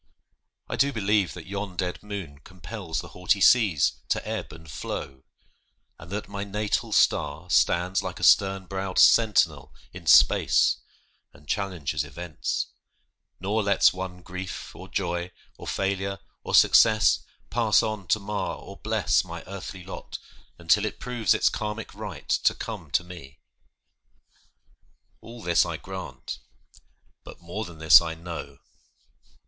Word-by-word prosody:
I 115 - -4
do 140 +4 +3
believe 105 -4 +1
That 90 - -9
yon 100 -1 -5
dead 90 -1 -2
moon 100 -9 -7
compels 95 +1 -6
the 85 - -11
haughty 90 +4 0
seas 100 - +4
To - - -1
ebb - - -4
and 80 +1 -13
flow, 65 -2 -6 0.7
and 80 - -12
that 100 +2 -4
my 100 0 -5
natal 105 +1 -2
star 75 +4 +1
Stands 85 +4 +2
like - - -6
a - - -7
stern 95 -2 +4
browed 95 0 -4
sentinel 110 -3 +4 0.2
in - - -10
space - - +5 0.6
And 75 -2 -19
challenges 95 -7 -2
events; 85 -2 -4 0.7
nor 105 +4 0
lets 100 -1 +4
one 90 -1 -7
grief, 90 +2 -7
Or 95 - -10
joy, 85 -2 -2 0.3
or - - -11
failure, 100 0 -1 0.3
or - - 0
success, 110 -2 +6 0.3
pass 115 -3 +3
on 105 -4 -4
To 110 - +2
mar 105 +1 -3
or - - -11
bless - - +1
my - - -8
earthly 95 -1 -8
lot, 95 - -8 0.4
until 85 +5 +3
It 110 - -4
proves 120 -3 +1
its - - +2
Karmic 105 0 -3
right - - -8
to - - +2
come - - -7
to - - +1
me. 80 -6 -12 1.8
All 115 0 -11
this 85 -1 +4
I 85 -2 -4
grant, 95 -8 -7 0.8
but - - -12
more 85 +6 -5
than 85 -3 -11
this 80 -1 +8
I 80 -1 -4
know! 80 -4 -8
95 Hz, 140 wpm, -26 LUFS, 85-105 Hz, 1.8 s, this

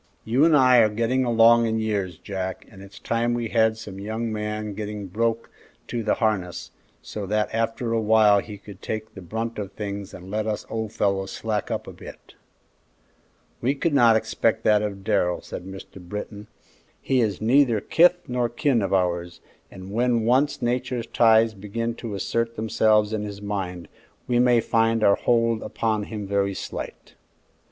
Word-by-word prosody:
You 125 +7 +3
and 160 -2 +5
I 130 -2 +6
are 110 -2 +5
getting 115 +4 0
along 115 0 +5
in 110 0 0
years, 100 -6 -2
Jack, 95 -1 -5
and 95 -3 -13
it's 100 +2 -13
time 120 +1 -1
we 120 -2 -3
had 110 -1 +2
some 100 -3 -9
young 110 +2 -3
man 105 0 -4
getting 105 0 -5
broke 115 +4 -2 0.4
to 120 - -2
the 110 - +1
harness, 100 -6 -2 0.3
so 100 - -6
that 105 +1 0
after 115 +1 -1
a 115 - +1
while 105 -1 +5
he 105 0 -8
could 100 -1 -13
take 110 0 -5
the 95 - -10
brunt 110 +5 -4
of 100 -1 -6
things 100 -1 -5
and 95 +2 -11
let 110 +1 -1
us 105 -1 -3
old 110 -2 -3
fellows 95 -2 0
slack 110 -2 -3
up - - -3
a - - -9
bit." - - -13 1.3
"We 130 +4 +1
could 160 +2 -1
not 120 -5 +6
expect 110 0 0
that 105 -1 +4
of 100 -2 -4
Darrell," 90 -2 +1
said 90 - -8
Mr. 95 0 -10
Britton. 105 +3 -7 0.5
"He 130 -2 +1
is 105 -5 -1
neither 120 0 +3
kith 175 - +3
nor 125 -1 0
kin 135 -1 +1
of 100 0 0
ours, 90 -1 -1 0.3
and 95 +1 -10
when 120 0 +1
once 130 +3 +2
Nature's 125 0 -1
ties 115 -1 +4
begin 110 +4 -4
to 110 -4 -5
assert 115 +4 -2
themselves 110 -1 +2
in 110 - -1
his 100 -1 -6
mind, 95 -4 -4 0.4
we 120 -1 +2
may 120 -1 +4
find 115 0 +1
our 100 - +6
hold 115 -2 +1
upon 110 -2 -2
him 105 -2 -6
very 100 0 0
slight." - - -7
110 Hz, 180 wpm, -24 LUFS, 100-115 Hz, 1.3 s, I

